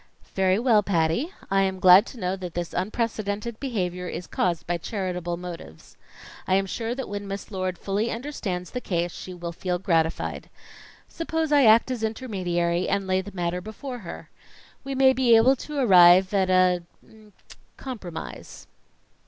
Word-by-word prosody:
"Very 190 0 +2
well, 230 -2 +4
Patty, 190 - 0 0.2
I 195 0 +3
am 190 -1 -1
glad 185 +4 +7
to 245 - -10
know 185 -1 -1
that 180 -3 -8
this 175 -1 -4
unprecedented 215 +2 -3
behavior 180 -9 -3
is 175 +1 -5
caused 170 +2 -1
by 175 0 -2
charitable 180 -3 -3
motives. 180 -1 -10 0.5
I 185 - +3
am 195 0 +2
sure 230 +4 -3
that 265 -1 -5
when 205 0 -5
Miss 195 +2 -6
Lord 185 -2 -3
fully 205 +5 -1
understands 220 - -4
the 250 - -4
case 175 -4 -1
she 185 +2 -9
will 170 -1 -6
feel 180 +1 -2
gratified. 165 -3 -1 0.6
Suppose 320 -2 -3
I 285 -3 +5
act 225 +3 +5
as 245 -3 -3
intermediary 185 -7 -1
and 200 0 0
lay 185 0 +1
the 205 - -10
matter 175 0 -2
before 245 +6 -7
her? 180 -6 -9 0.5
We 275 0 -4
may 265 0 +5
be 250 -2 +4
able 245 +4 +5
to 300 +4 -7
arrive 185 -5 +6
at 190 -2 +2
an 180 -2 +3 0.2
er 215 -1 -19 0.5
compromise." 205 -11 -8
195 Hz, 165 wpm, -25 LUFS, 180-230 Hz, 0.6 s, glad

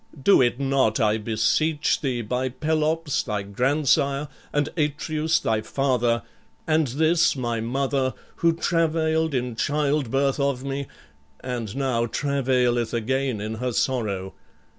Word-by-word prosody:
Do 165 +5 +5
it 120 0 +2
not, 135 -5 +1
I 110 -1 +2
beseech 115 +8 +1
thee, 125 -4 -1
by 125 +4 -1
Pelops 155 +2 0
thy 105 -3 -3
grandsire, 140 +5 +1 0.2
and 145 0 +1
Atreus 155 +1 0
thy 110 -1 0
father, 120 -4 0 0.4
and 155 -1 +2
this 160 +6 +2
my 120 -3 -2
mother, 130 +2 -1 0.2
who 170 - +3
travailed 160 -2 +1
in 125 -2 -2
childbirth 140 0 0
of 140 -2 0
me 140 0 -3 0.5
and 120 -4 -4
now 130 -4 0
travaileth 125 -4 0
again 130 0 -1
in 105 +2 -4
her 125 0 -1
sorrow. 105 -8 -1
135 Hz, 125 wpm, -24 LUFS, 120-150 Hz, 0.5 s, Do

